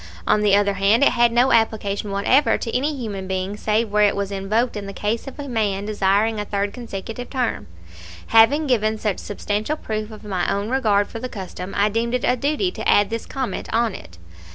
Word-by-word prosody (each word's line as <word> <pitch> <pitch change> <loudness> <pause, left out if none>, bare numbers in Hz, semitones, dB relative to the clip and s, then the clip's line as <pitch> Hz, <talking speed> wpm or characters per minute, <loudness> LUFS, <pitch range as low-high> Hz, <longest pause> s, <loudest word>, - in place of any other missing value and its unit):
On 210 - +3
the 205 -1 +4
other 200 0 +2
hand, 200 +6 +3
it - - +5
had 240 0 +3
no 245 +3 +3
application 210 -2 +1
whatever 205 +9 +3
to 230 - -4
any 290 +4 0
human 205 -7 -5
being 190 +1 -2
save 215 +1 0
where 210 0 +2
it 205 -1 +4
was 200 0 -3
invoked 210 +5 0
in 205 -1 -5
the 195 - -6
case 215 +6 -2
of 270 - -8
a 285 - -5
man 205 -5 -1
desiring 210 +1 +1
a 210 - -3
third 200 0 -2
consecutive 235 0 -7
term. 250 -4 -2 0.6
Having 260 +8 +5
given 220 -5 +1
such 210 -3 -2
substantial 210 +7 -3
proof 215 -4 -4
of 215 -1 -11
my 190 -4 -1
own 200 +2 -2
regard 215 -6 +2
for 225 - -7
the 255 +2 -5
custom, 185 -2 -7
I 205 +1 +3
deem 230 +3 -1
it 250 - 0
a 250 - +3
duty 300 +8 0
to - - -3
add 205 +1 +4
this 230 0 -4
comment 265 -3 -4
on 230 -2 +1
it. 85 - -11
215 Hz, 215 wpm, -22 LUFS, 200-240 Hz, 0.6 s, it